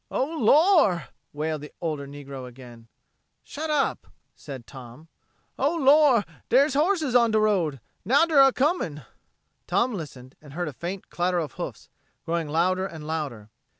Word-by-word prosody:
"Oh, 260 - 0
Lor'!" 290 - +4 0.2
wailed 155 0 -3
the 150 - -10
older 155 -4 -3
negro 140 -2 -9
again. 120 -2 -13 0.6
"Shut 310 +2 -6
up!" 295 -3 0 0.3
said 135 -5 -9
Tom. 130 +6 -13 0.5
"O 285 +5 +1
Lor' 280 - +5 0.2
der's 275 +3 +4
horses 310 -2 +1
on 235 -2 +5
de 215 0 +2
road! 180 -10 +1 0.2
Now 275 - +4
der 310 -4 +5
a 270 0 +7
coming!" 255 - -1 0.6
Tom 235 +8 +1
listened 135 -8 -8
and 145 -3 -14
heard 175 +1 -3
a - - -10
faint 180 +7 -7
clatter 175 +1 0
of 155 -6 -2
hoofs, - - -7 0.4
growing 165 -1 -2
louder 185 +4 +1
and 160 -5 -10
louder. 140 -10 -5
175 Hz, 150 wpm, -25 LUFS, -, 0.6 s, a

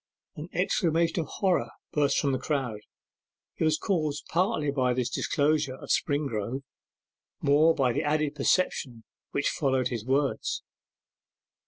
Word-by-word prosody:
An 155 +3 -7
exclamation 170 -2 +1
of 160 - -2
horror 185 +2 0 0.2
burst 145 -2 +2
from 140 - +2
the 130 - 0
crowd; 130 -6 -2 0.8
it - - -1
was 155 -1 +3
caused 155 -7 -1
partly 175 -4 +1
by 130 -3 +1
this 125 -1 -1
disclosure 145 -2 +1
of - - -11
Springrove, 135 - -1 0.8
more 155 +3 +4
by 130 -4 +2
the - - 0
added 150 -1 0
perception 135 -5 0 0.3
which 145 - 0
followed 130 -3 +1
his 115 -4 -4
words. 135 +3 0
145 Hz, 135 wpm, -28 LUFS, 130-155 Hz, 0.8 s, more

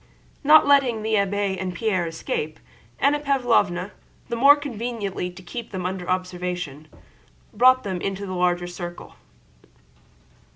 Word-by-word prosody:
Not 305 +2 +7
letting 265 -6 +3
the 220 0 -1
abbé 200 -1 0
and 185 -2 -4
Pierre 185 -4 0
escape, 155 -1 -4 0.4
Anna 290 +2 +2
Pávlovna, 245 -10 +1 0.4
the 235 - -2
more 275 +5 +7
conveniently 230 -9 -4
to 180 +1 -13
keep 230 +6 -7
them 185 -2 -5
under 185 -1 -4
observation, 180 -5 -3 0.7
brought 255 +1 +5
them 185 -3 -4
into 195 +1 -3
the 185 - -5
larger 180 -1 +1
circle. 175 0 -8
195 Hz, 130 wpm, -23 LUFS, 180-240 Hz, 0.7 s, Not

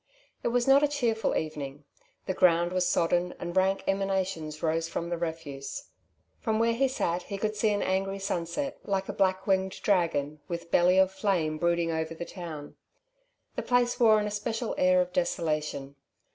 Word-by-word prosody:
It - - -1
was 240 +1 +1
not 270 +1 +7
a 295 - +4
cheerful 240 -7 0
evening. 145 -2 -5 0.4
The 190 - -1
ground 175 -1 +3
was 180 -1 +1
sodden, 175 +1 +1
and 175 +1 -6
rank 190 +1 +2
emanations 190 -5 -1
rose 165 0 0
from 170 0 -3
the 175 - -2
refuse. 160 - -5 0.5
From 220 -2 0
where 230 +1 +3
he 270 +4 +2
sat 180 -9 -1
he 200 +2 -6
could 215 +1 -2
see 215 +1 +2
an 205 -1 0
angry 195 +1 0
sunset 195 - -3
like 195 -1 -1
a - - -2
black 190 0 +1
winged 190 -1 +1
dragon 160 -6 +1
with 170 -1 -5
belly 180 +1 +4
of 190 0 +5
flame 180 -6 0
brooding 170 0 +1
over 160 0 -2
the 170 - -5
town. 160 -6 -8 0.8
The - - -1
place 245 -1 +1
wore 220 -3 +6
an 210 - -1
especial 220 +3 -2
air 185 0 +4
of 180 0 -3
desolation. 155 -5 -1
185 Hz, 175 wpm, -28 LUFS, 165-205 Hz, 0.8 s, not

